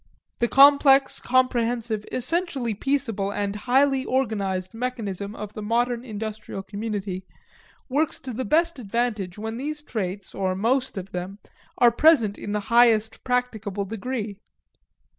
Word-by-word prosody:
The 235 - +2
complex, 275 0 +6
comprehensive, 240 -4 0
essentially 270 -3 -1
peaceable, 225 -5 -1
and 205 0 -2
highly 265 +4 +2
organized 200 -8 -1
mechanism 220 -4 -4
of 210 -1 -7
the 215 - -6
modern 235 +2 0
industrial 215 -3 -6
community 200 -2 -4 0.6
works 290 +3 0
to 255 - -6
the 255 +4 -3
best 330 +5 +1
advantage 215 -4 -2
when 220 +2 -5
these 295 +3 -4
traits, 195 -6 -4
or 190 -1 -1
most 245 +4 0
of 190 0 -6
them, 180 +2 -5 0.4
are 240 -1 +6
present 235 -6 +4
in 205 - -5
the 210 0 -1
highest 225 -2 +4
practicable 220 -6 -1
degree. 215 0 -4
225 Hz, 130 wpm, -24 LUFS, 205-255 Hz, 0.6 s, complex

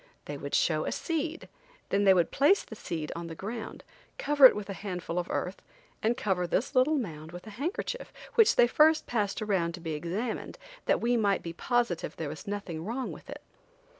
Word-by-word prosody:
They - - -5
would - - -3
show - - +2
a - - -1
seed, 325 -1 -3 0.4
then 200 +1 +2
they 190 - +8
would 175 -3 +2
place 295 +9 +4
the 220 - -10
seed 165 -8 -4
on 170 0 -5
the 165 - -7
ground, 220 +6 -6 0.3
cover 285 -2 +8
it - - 0
with 210 -1 -5
a 200 - -4
handful 180 -3 -4
of 175 - -4
earth, 180 +2 -3 0.4
and 230 +3 +1
cover 190 -7 0
this 220 +10 0
little 280 +4 +4
mound 160 - -5
with 175 +3 -9
a 215 - -9
handkerchief, 350 - -4 0.2
which 455 -3 +5
they 240 - +7
first 310 +6 +4
passed 210 -3 -1
around 185 -5 0
to - - -11
be 165 -2 -4
examined, 190 - -3 0.3
that - - +3
we 240 +1 +2
might 200 -3 +2
be 170 - -5
positive 235 -2 0
there 160 -3 -4
was 155 +5 -8
nothing 195 -6 -4
wrong 240 +7 -3
with - - -12
it. - - -8
205 Hz, 205 wpm, -29 LUFS, 175-255 Hz, 0.4 s, they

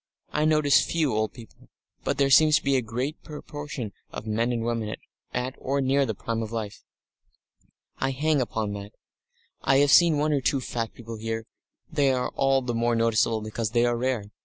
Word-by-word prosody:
I 150 +1 +1
notice 150 -4 +4
few 155 -6 0
old 110 0 0
people, 115 -3 -15 0.3
but 140 - -1
there 140 -1 +2
seems 155 +2 +7
to - - +1
be 140 0 +2
a 130 - +3
greater 125 +7 -3
proportion 145 -6 -7 0.2
of - - -7
men 115 +3 0
and 115 -2 -1
women 115 -2 -2 0.4
at 125 +1 -2
or 140 +2 -1
near 135 +1 +2
the 110 - -2
prime 115 +3 -3
of 110 -1 -5
life. 110 -3 -5 1.2
I 135 - +1
hang 145 +2 +1
upon 110 -4 -2
that. 100 0 -8 0.7
I 135 - +3
have 140 0 +4
seen 170 -2 +6
one 150 +1 +1
or 140 - +1
two 135 +2 +1
fat 115 -2 -3
people 115 -1 -8
here 115 0 -4 0.5
they 145 -4 +3
are 125 -1 -1
all 135 -1 +2
the 125 -1 -2
more 120 0 +1
noticeable 115 -1 +2
because 110 0 -3
they 120 0 +4
are 120 0 +1
rare. 120 -4 -2
125 Hz, 195 wpm, -26 LUFS, 115-140 Hz, 1.2 s, seems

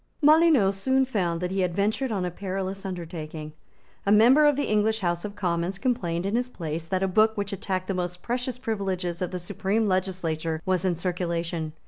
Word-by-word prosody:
Molyneux 305 -9 +5
soon 265 +7 +1
found 180 -9 -1
that 180 0 -2
he 195 - -1
had 180 -2 0
ventured 220 +6 0
on 190 -4 -1
a 180 - -2
perilous 195 +1 -4
undertaking. 160 -4 -6 0.5
A 200 - +1
member 250 +8 +7
of 295 - +4
the 285 - 0
English 215 +1 +1
House 175 -2 0
of 205 -1 -6
Commons 180 -1 -1
complained 180 -7 -1
in 200 +3 0
his 245 +1 0
place 165 -6 -5
that 185 +2 0
a - - +2
book 215 +4 +3
which 200 0 -2
attacked 185 -1 -2
the 195 - -1
most 180 -1 -4
precious 245 +1 -2
privileges 190 -7 -2
of 180 - -1
the 185 - -4
supreme 200 +4 -1
legislature 175 -4 -1
was 185 -1 +1
in 180 -2 +2
circulation. 170 -2 -2
190 Hz, 195 wpm, -26 LUFS, 175-215 Hz, 0.5 s, member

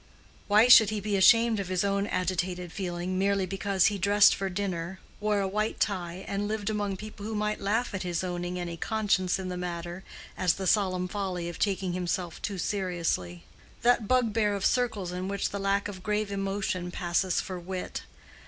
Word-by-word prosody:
Why 215 +3 +6
should 225 -4 +9
he 215 -1 -2
be 205 0 -1
ashamed 230 +3 +5
of 195 - -3
his 185 0 0
own 200 0 0
agitated 180 -2 -2
feeling 180 -1 -3
merely 195 0 +2
because 195 0 +1
he 205 -1 +2
dressed 205 +2 +6
for 195 0 -2
dinner, 185 -1 -3 0.2
wore 210 -1 +1
a 195 - 0
white 215 +3 -1
tie, 185 -2 -2
and 200 +1 -2
lived 215 0 -2
among 205 -2 -2
people 215 0 -9
who 220 +1 -4
might 210 0 -1
laugh 220 +4 0
at 190 - -3
his 175 -1 -2
owning 175 0 -3
any 170 -1 -4
conscience 200 -3 +1
in 190 -1 -5
the 180 - -4
matter, 175 +1 -5 0.3
as 180 -3 +2
the 190 - -4
solemn 185 -2 +2
folly 180 -3 -3
of 170 - -8
taking 190 -3 0
himself 180 -1 -3
too 200 -2 -3
seriously?—that 180 - -1
bugbear 225 -4 +2
of 195 - -2
circles 220 -8 +1
in 180 +1 -4
which 200 0 -2
the 200 - -3
lack 200 +1 +1
of 190 -3 -8
grave 210 +1 -1
emotion 195 -2 -2
passes 175 0 0
for 185 -1 -4
wit. 180 +1 -5
195 Hz, 185 wpm, -28 LUFS, 180-205 Hz, 0.3 s, should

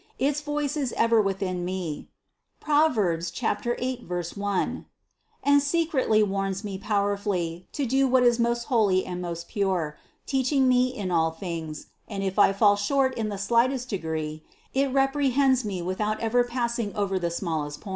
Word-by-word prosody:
Its 280 +4 0
voice 295 -1 -2
is 275 -5 -2
ever 230 -1 +3
within 195 -2 -2
me 180 -4 -4 0.5
(Prov. 300 -3 +3
8, 225 +7 -1
1) 180 +3 -2 0.6
and 285 0 +5
se 330 +4 +1
cretly 220 -8 +2
warns 195 0 -2
me 195 -2 -5
powerfully 200 -4 -1
to 285 - -2
do 270 +2 +2
what 255 0 +4
is 240 -1 +4
most 235 0 +1
holy 210 -7 +2
and 180 -1 -5
most 170 -1 -5
pure, 185 -8 -1 0.3
teaching 265 0 +2
me 250 0 +4
in 210 -8 -4
all 165 -1 +3
things; 160 -2 -6 0.2
and 195 -2 -4
if 190 +1 -1
I 200 - +6
fall 205 +1 +4
short 260 +6 +1
in 220 -3 -2
the 205 - -4
slightest 240 +5 +1
degree, 160 -4 -3 0.3
it 275 0 +1
reprehends 270 -1 +2
me 190 -5 -3
without 210 +4 -1
ever 235 +2 +2
pass 240 -1 -2
ing 205 -3 -3
over 195 -2 0
the 170 -1 -1
smallest 160 -4 -3
point. 205 - -9
210 Hz, 165 wpm, -26 LUFS, 185-255 Hz, 0.6 s, I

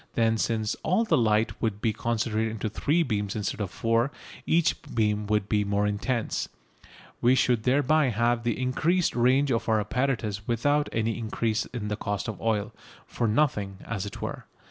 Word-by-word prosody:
Then, 115 -1 +2
since 110 -2 0
all 185 +8 +2
the 195 -8 +2
light 110 -4 +1
would 105 -3 -1
be 110 0 0
concentrated 115 0 -1
into 110 0 -3
three 150 +10 +1
beams 105 -6 -2
instead 105 0 -3
of 100 - -2
four, 115 +6 +1 0.4
each 165 0 +3
beam 105 -2 -1
would 105 -1 +1
be 105 -1 +2
more 100 0 0
intense. 110 +3 -1 0.7
We 125 +2 +5
should 120 -4 +2
thereby 145 +3 +3
have 120 +1 +1
increased 130 +9 +1
the - - -3
range 130 +3 +3
of 115 -1 0
our 110 -1 +3
apparatus 110 -3 -1
without 145 +6 +1
any 115 +1 -1
increase 110 -1 -1
in 110 -4 -5
the 105 - -2
cost 100 +2 -3
of 110 -3 -5
oil 110 -3 0 0.3
for 115 - -2
nothing, 105 -5 +1
as 105 -3 -3
it - - -8
were. - - -5
115 Hz, 175 wpm, -27 LUFS, 105-125 Hz, 0.7 s, We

